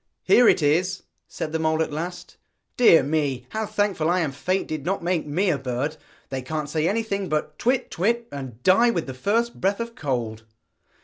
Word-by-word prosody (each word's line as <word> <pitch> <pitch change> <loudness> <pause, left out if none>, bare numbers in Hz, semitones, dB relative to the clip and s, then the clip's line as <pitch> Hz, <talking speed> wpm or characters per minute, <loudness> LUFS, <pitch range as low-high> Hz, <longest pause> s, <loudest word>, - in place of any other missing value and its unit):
'Here 245 - +6
it 160 - +3
is,' 180 +5 +1 0.2
said 155 - -5
the 160 - -1
mole 160 0 +2
at 155 - -6
last; 175 +3 -6 0.4
'dear 230 -9 +6
me, 140 -3 -1
how 220 -1 -3
thankful 205 -6 0
I 180 +1 +2
am 155 -4 -1
Fate 185 +8 -1
did 155 -3 -4
not 185 +2 -2
make 170 -3 0
me 180 +6 +1
a 145 - -1
bird. 135 +4 -2 0.3
They 135 -1 -3
can't 150 +3 -4
say 155 +1 +1
anything 200 -2 -1
but 150 0 -2
"twit, 250 +2 0
twit," 230 +6 0
and 130 -4 -8
die 230 +6 +5
with 175 -8 -1
the 130 - -6
first 225 - -1
breath 195 +3 +1
of 230 0 -4
cold.' 120 - -3
165 Hz, 195 wpm, -24 LUFS, 145-200 Hz, 0.4 s, Here